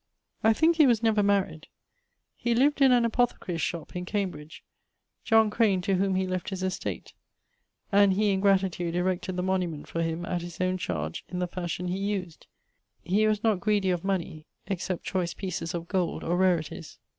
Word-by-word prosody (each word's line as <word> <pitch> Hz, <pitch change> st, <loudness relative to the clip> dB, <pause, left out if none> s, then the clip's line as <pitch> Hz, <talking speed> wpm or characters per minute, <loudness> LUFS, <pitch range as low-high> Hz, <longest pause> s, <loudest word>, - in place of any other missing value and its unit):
I 220 Hz, -, +6 dB
thinke 320 Hz, +7 st, +3 dB
he 305 Hz, -4 st, +6 dB
was 235 Hz, -2 st, +2 dB
never 220 Hz, -2 st, +3 dB
maried. 200 Hz, -6 st, 0 dB, 0.7 s
He 235 Hz, -1 st, 0 dB
lived 285 Hz, +4 st, +3 dB
in 270 Hz, -1 st, +7 dB
an 240 Hz, -1 st, +4 dB
apothecary's 225 Hz, -8 st, 0 dB
shop, 170 Hz, +3 st, -4 dB
in 180 Hz, -, -3 dB
Cambridge, 180 Hz, -6 st, -4 dB, 0.9 s
Crane, 210 Hz, -4 st, +2 dB
to 195 Hz, +2 st, 0 dB
whom 190 Hz, 0 st, +1 dB
he 190 Hz, 0 st, +1 dB
left 185 Hz, -1 st, -3 dB
his 190 Hz, -2 st, -4 dB
estate; 185 Hz, 0 st, -4 dB, 0.8 s
and 200 Hz, -1 st, +5 dB
he 205 Hz, +1 st, +2 dB
in 190 Hz, -, +1 dB
gratitude 190 Hz, -3 st, +1 dB
erected 180 Hz, 0 st, -1 dB
the 180 Hz, -, -2 dB
monument 180 Hz, -5 st, -2 dB
for 165 Hz, -, -3 dB
him, 165 Hz, +1 st, -2 dB
at 175 Hz, 0 st, -2 dB
his 175 Hz, -1 st, -9 dB
owne 185 Hz, 0 st, 0 dB
chardge, 80 Hz, -, -3 dB
in 180 Hz, -, -5 dB
the 180 Hz, -, 0 dB
fashion 180 Hz, 0 st, -4 dB
he 180 Hz, +2 st, -2 dB
used. 195 Hz, -5 st, -4 dB, 0.6 s
He 210 Hz, +4 st, +2 dB
was 215 Hz, -1 st, 0 dB
not 220 Hz, -5 st, +2 dB
greedy 200 Hz, -1 st, +1 dB
of 175 Hz, -1 st, -2 dB
money, 175 Hz, -5 st, -3 dB, 0.2 s
except 185 Hz, -2 st, -3 dB
choice 180 Hz, -2 st, -2 dB
pieces 180 Hz, -3 st, -4 dB
of 170 Hz, 0 st, -5 dB
gold 180 Hz, -3 st, -1 dB
or 170 Hz, -, 0 dB
rarities. 170 Hz, -3 st, 0 dB
185 Hz, 180 wpm, -27 LUFS, 175-205 Hz, 0.9 s, in